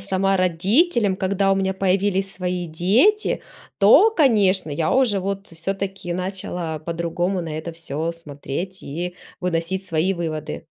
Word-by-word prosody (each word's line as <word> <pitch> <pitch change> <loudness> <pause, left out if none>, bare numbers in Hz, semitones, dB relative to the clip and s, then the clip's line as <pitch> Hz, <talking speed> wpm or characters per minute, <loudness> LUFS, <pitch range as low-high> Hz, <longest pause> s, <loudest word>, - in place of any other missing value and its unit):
сама 195 +1 +1
родителем, 195 - +2
когда 195 0 +1
у - - +2
меня 190 0 0
появились 195 0 +1
свои 180 -1 -2
дети, 210 - +2 0.4
то, 285 - +7
конечно, 205 - +3
я 155 +2 0
уже, 235 -7 +3
вот, 195 +1 -4
всё-таки, 195 +1 -4
начала 180 -3 -4
по-другому 170 +3 -2
на 155 -2 -5
это 165 +2 -6
всё 165 0 -3
смотреть 165 +4 -6
и 175 +5 -5 0.2
выносить 180 +2 -1
свои 165 +4 +1
выводы. 155 - -4
185 Hz, 135 wpm, -22 LUFS, 165-195 Hz, 0.4 s, то